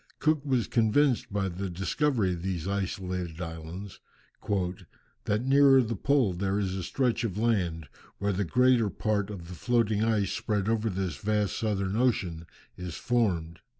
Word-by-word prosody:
Cook 155 Hz, -2 st, +1 dB
was 130 Hz, -5 st, +1 dB
convinced 120 Hz, +3 st, +2 dB
by 100 Hz, -1 st, 0 dB
the 95 Hz, +2 st, -4 dB
discovery 95 Hz, -, 0 dB
of 85 Hz, -, -6 dB
these 90 Hz, -2 st, -3 dB
isolated 90 Hz, -3 st, -3 dB
islands 85 Hz, +3 st, -7 dB, 1.3 s
"that 105 Hz, +4 st, 0 dB
near 135 Hz, 0 st, +6 dB
the 115 Hz, 0 st, -3 dB
pole 130 Hz, -3 st, +2 dB
there 95 Hz, +2 st, -1 dB
is 95 Hz, -3 st, -1 dB
a 95 Hz, -, -3 dB
stretch 120 Hz, +5 st, 0 dB
of 105 Hz, -4 st, -2 dB
land, 90 Hz, -9 st, 0 dB, 0.3 s
where 100 Hz, 0 st, 0 dB
the 100 Hz, +2 st, 0 dB
greater 125 Hz, +2 st, +3 dB
part 105 Hz, -1 st, -1 dB
of 90 Hz, -5 st, -7 dB
the 90 Hz, -, -8 dB
floating 110 Hz, +1 st, +1 dB
ice 110 Hz, -4 st, +1 dB
spread 105 Hz, -4 st, -1 dB
over 115 Hz, 0 st, +1 dB
this 95 Hz, -6 st, -3 dB
vast 105 Hz, +2 st, 0 dB
southern 100 Hz, -3 st, -1 dB
ocean 95 Hz, -9 st, 0 dB, 0.3 s
is 90 Hz, -2 st, -6 dB
formed." 90 Hz, -9 st, 0 dB
100 Hz, 155 wpm, -28 LUFS, 90-115 Hz, 1.3 s, near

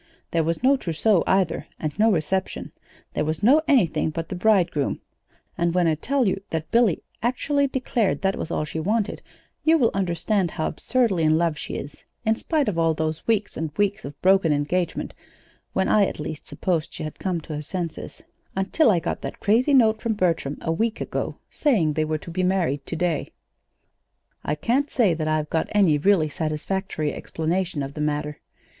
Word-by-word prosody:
There 165 Hz, -1 st, +2 dB
was 165 Hz, +7 st, -2 dB
no 275 Hz, +2 st, +5 dB
trousseau, 180 Hz, -1 st, +1 dB
either, 190 Hz, -3 st, +1 dB
and 155 Hz, +5 st, -4 dB
no 220 Hz, +1 st, +5 dB
reception. 190 Hz, +2 st, -1 dB, 0.4 s
There 150 Hz, -, 0 dB
was 155 Hz, +5 st, -2 dB
no 280 Hz, +8 st, +6 dB
anything 195 Hz, -, +3 dB
but 165 Hz, +1 st, -5 dB
the -, -, -4 dB
bridegroom; 180 Hz, -7 st, +2 dB, 0.6 s
and 170 Hz, 0 st, +1 dB
when 180 Hz, -1 st, +3 dB
I 160 Hz, -, +3 dB
tell 255 Hz, -, 0 dB
you 195 Hz, +1 st, 0 dB
that 160 Hz, -1 st, -4 dB
Billy 230 Hz, -6 st, +3 dB, 0.2 s
actually 280 Hz, +4 st, +1 dB
declared 245 Hz, -7 st, -1 dB
that 195 Hz, 0 st, +2 dB
was -, -, -5 dB
all 155 Hz, -, -1 dB
she 160 Hz, -, -5 dB
wanted, 210 Hz, +5 st, -1 dB, 0.4 s
you 325 Hz, +1 st, +5 dB
will 245 Hz, -7 st, +3 dB
understand 185 Hz, +1 st, 0 dB
how 155 Hz, -, -3 dB
absurdly 230 Hz, -8 st, +1 dB
in 155 Hz, 0 st, +4 dB
love 165 Hz, -2 st, +1 dB
she 150 Hz, -, -6 dB
is 145 Hz, +1 st, -7 dB, 0.2 s
in 220 Hz, 0 st, +3 dB
spite 300 Hz, +4 st, 0 dB
of 180 Hz, -5 st, 0 dB
all 165 Hz, -1 st, +2 dB
those 155 Hz, 0 st, -3 dB
weeks 215 Hz, -2 st, +1 dB
and 155 Hz, -2 st, -4 dB
weeks 205 Hz, -1 st, +1 dB
of 140 Hz, +1 st, -8 dB
broken 190 Hz, -3 st, +4 dB
engagement 160 Hz, +4 st, -1 dB, 0.6 s
when 190 Hz, -, +1 dB
I, 205 Hz, -2 st, +4 dB
at -, -, -6 dB
least, 150 Hz, 0 st, -6 dB
supposed 170 Hz, -4 st, -1 dB
she -, -, -5 dB
had 155 Hz, -, -7 dB
come 185 Hz, -3 st, -1 dB
to 155 Hz, -, -8 dB
her 150 Hz, -, -3 dB
senses, 170 Hz, +1 st, -5 dB, 0.3 s
until 195 Hz, +9 st, +3 dB
I 195 Hz, -, +4 dB
got -, -, -3 dB
that -, -, -6 dB
crazy 245 Hz, +7 st, +3 dB
note 220 Hz, -4 st, +4 dB
from 230 Hz, -, 0 dB
Bertram 165 Hz, -8 st, 0 dB
a 165 Hz, -, -1 dB
week 220 Hz, +7 st, 0 dB
ago -, -, -3 dB
saying 200 Hz, -, +1 dB
they 155 Hz, +1 st, 0 dB
were 155 Hz, 0 st, -1 dB
to 170 Hz, -, -10 dB
be 185 Hz, -, -1 dB
married 175 Hz, -7 st, 0 dB
today. 165 Hz, -2 st, -1 dB, 1.1 s
"I 150 Hz, -, -1 dB
can't 255 Hz, -, 0 dB
say 215 Hz, -8 st, +3 dB
that 160 Hz, -1 st, -2 dB
I've 155 Hz, -1 st, 0 dB
got 160 Hz, -, 0 dB
any 185 Hz, -8 st, +4 dB
really 185 Hz, -1 st, +3 dB
satisfactory 155 Hz, +1 st, -2 dB
explanation 165 Hz, -1 st, -2 dB
of 135 Hz, +1 st, -6 dB
the 150 Hz, -, -5 dB
matter. 150 Hz, 0 st, -2 dB
175 Hz, 190 wpm, -24 LUFS, 155-215 Hz, 1.1 s, no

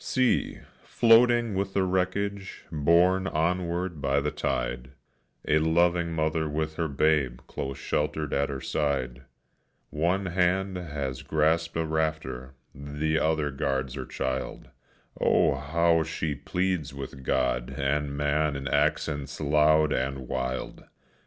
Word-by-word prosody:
See, 130 Hz, -2 st, +1 dB, 0.3 s
floating 120 Hz, -1 st, +4 dB
with 95 Hz, 0 st, -2 dB
the 95 Hz, -, +3 dB
wreckage, 95 Hz, +2 st, -2 dB
borne 85 Hz, +5 st, +3 dB
onward 85 Hz, 0 st, -1 dB
by 70 Hz, 0 st, +2 dB
the 75 Hz, +1 st, -1 dB
tide, 60 Hz, +1 st, -3 dB, 0.5 s
A 75 Hz, -, +4 dB
loving 85 Hz, +2 st, +2 dB
mother 80 Hz, -1 st, 0 dB
with 80 Hz, +1 st, -2 dB
her 85 Hz, -, 0 dB
babe 70 Hz, -4 st, +1 dB
close 70 Hz, 0 st, -5 dB
sheltered 75 Hz, -1 st, -2 dB
at 70 Hz, 0 st, +1 dB
her 70 Hz, -1 st, -4 dB
side; 65 Hz, -3 st, -2 dB, 0.7 s
One 90 Hz, +6 st, 0 dB
hand 95 Hz, +2 st, +1 dB
has 70 Hz, -7 st, -4 dB
grasped 80 Hz, +2 st, +1 dB
a 80 Hz, -, 0 dB
rafter, 80 Hz, -5 st, -2 dB, 0.2 s
the 75 Hz, +3 st, -2 dB
other 80 Hz, -2 st, +1 dB
guards 65 Hz, -1 st, -2 dB
her 65 Hz, -2 st, -6 dB
child; 65 Hz, 0 st, -4 dB, 0.5 s
Oh, -, -, +3 dB
how 80 Hz, +5 st, +2 dB
she 80 Hz, -1 st, -2 dB
pleads 90 Hz, -1 st, -2 dB
with 70 Hz, 0 st, -7 dB
God 65 Hz, -2 st, 0 dB
and 70 Hz, +1 st, -1 dB
man 75 Hz, 0 st, +1 dB
in 70 Hz, 0 st, -4 dB
accents 70 Hz, -2 st, 0 dB
loud 75 Hz, +1 st, +3 dB
and 65 Hz, -1 st, -2 dB
wild! 65 Hz, 0 st, -3 dB
75 Hz, 125 wpm, -27 LUFS, 70-85 Hz, 0.7 s, floating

